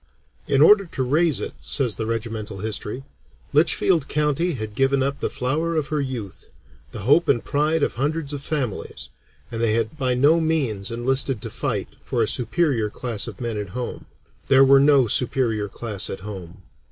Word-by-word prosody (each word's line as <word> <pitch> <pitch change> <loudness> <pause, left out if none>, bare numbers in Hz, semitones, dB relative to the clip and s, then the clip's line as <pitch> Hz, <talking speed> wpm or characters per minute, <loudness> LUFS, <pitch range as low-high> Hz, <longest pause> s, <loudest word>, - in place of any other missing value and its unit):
"In 140 +1 +4
order 200 +2 +6
to 135 - -3
raise 155 +4 +2
it," - - -5
says 125 -7 -1
the 110 - -3
regimental 110 -2 -4
history, 110 +4 -4 0.5
"Litchfield 155 +1 +3
County 150 +4 0
had 110 -5 -5
given 135 +3 +2
up 140 +1 -2
the - - -1
flower 155 +6 -1
of 155 -3 -1
her 150 -1 0
youth, 120 -8 -6 0.4
the - - -7
hope 145 - +3
and 120 -4 +2
pride 150 +2 +1
of - - 0
hundreds 145 +3 -2
of 145 - -4
families, 140 -7 -4 0.4
and 115 -1 -4
they 115 -2 +2
had 115 +7 -2
by 130 -2 +1
no 145 +6 +4
means 135 -12 0
enlisted 130 +1 0
to - - -6
fight - - -3
for - - 0
a - - 0
superior 125 -4 +1
class 115 -1 -2
of - - -8
men 115 -3 -3
at 100 -2 -5
home. 125 - -5 0.4
There 135 0 +6
was 135 0 +6
no 140 -2 +5
superior 115 -3 +1
class 105 -2 -2
at 95 - -6
home. 95 -3 -9
130 Hz, 180 wpm, -23 LUFS, 110-150 Hz, 0.5 s, order